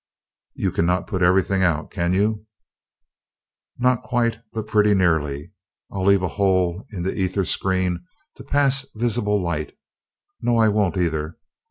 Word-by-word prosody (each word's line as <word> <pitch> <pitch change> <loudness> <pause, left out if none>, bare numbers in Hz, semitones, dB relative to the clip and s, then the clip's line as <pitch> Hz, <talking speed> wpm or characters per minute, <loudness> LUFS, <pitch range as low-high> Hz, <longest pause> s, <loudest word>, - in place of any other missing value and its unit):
"You - - -1
cannot 90 +2 0
put 95 - -3
everything 95 +1 +3
out, 85 -4 0
can 85 -1 -1
you?" 105 +3 0 1.3
"Not 125 -1 +2
quite, 115 -2 0
but 110 -1 -4
pretty 105 -1 +3
nearly, 80 -3 0 0.4
I'll 95 -1 -3
leave 100 -1 +4
a - - +1
hole 95 0 +1
in 90 -5 -5
the 95 - -1
ether 95 0 -1
screen 95 -1 0 0.3
to - - -10
pass 140 -1 +1
visible 110 -2 +1
light 85 -5 -3 0.6
no, 120 0 +1
I 110 -1 +4
won't 105 -2 +1
either. 80 -2 -1
95 Hz, 145 wpm, -22 LUFS, 90-105 Hz, 1.3 s, leave